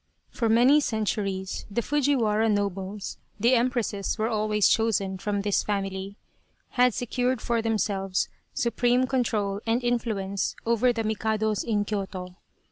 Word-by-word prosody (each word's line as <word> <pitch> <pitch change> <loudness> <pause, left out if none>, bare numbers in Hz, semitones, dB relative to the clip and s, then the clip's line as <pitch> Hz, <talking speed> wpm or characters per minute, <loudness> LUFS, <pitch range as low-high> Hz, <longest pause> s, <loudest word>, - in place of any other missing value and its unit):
For 230 -3 0
many 245 +6 +6
centuries 205 -6 -2
the 230 +3 -1
Fujiwara 240 -7 +2
nobles 200 -1 -2 0.2
(the 235 +5 +4
Em 245 0 +4
presses 220 -6 -2
were 220 +1 0
always 215 -2 +2
chosen 195 -4 +1
from 205 +1 -1
this 205 0 +1
family) 195 -1 -3 0.5
had 250 -2 +3
secured 250 +1 -1
for 235 0 0
themselves 200 -4 0 0.2
supreme 245 +2 +1
control 215 -6 -1
and 235 +2 +1
influence 215 -5 -1
over 235 +2 +3
the 230 -2 -2
Mikados 220 -1 0
in 210 -3 0
Kyoto. 190 -3 -4
215 Hz, 130 wpm, -26 LUFS, 200-240 Hz, 0.5 s, many